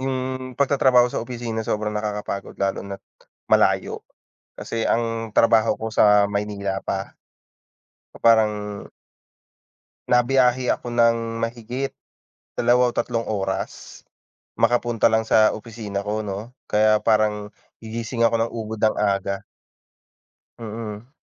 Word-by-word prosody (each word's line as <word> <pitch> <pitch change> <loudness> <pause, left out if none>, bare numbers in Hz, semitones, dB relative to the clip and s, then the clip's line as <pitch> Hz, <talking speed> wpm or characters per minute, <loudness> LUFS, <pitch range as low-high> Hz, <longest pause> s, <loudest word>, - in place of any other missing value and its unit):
yung 130 -1 -3
pagtatrabaho 130 -3 +4
sa - - -1
opisina 115 -2 -4
sobrang 105 -1 -2
nakakapagod 105 -2 -4
lalo 100 -1 -1
na't 100 0 -8 0.4
malayo, - - +2 0.5
kasi 115 -1 -4
ang 115 -1 -1
trabaho 115 0 +4
ko 110 - -2
sa 105 -2 +4
Maynila 100 -1 -3
pa. 95 0 -3 1.0
So - - -11
parang 105 -2 +2 1.2
na 125 -1 +4
biyahe 125 -1 +3
ako - - -5
ng 115 -1 +2
mahigit 120 +3 -3 0.6
2 125 +1 +3
o 120 - -4
3 115 -2 -1
oras, 95 -3 -4 0.5
makapunta 120 -1 +2
lang 110 0 +1
sa 110 -1 +5
opisina 110 -3 -6
ko 110 +1 -1
'no. 105 +5 -6 0.2
Kaya 110 0 +3
parang 105 -1 +1 0.3
gigising 115 +1 -3
ako 115 - +3
ng 115 0 0
ubod 110 -1 -5
ng 110 - +2
aga. 100 -1 -1 1.2
Mm. 110 0 -7
110 Hz, 120 wpm, -23 LUFS, 105-120 Hz, 1.2 s, sa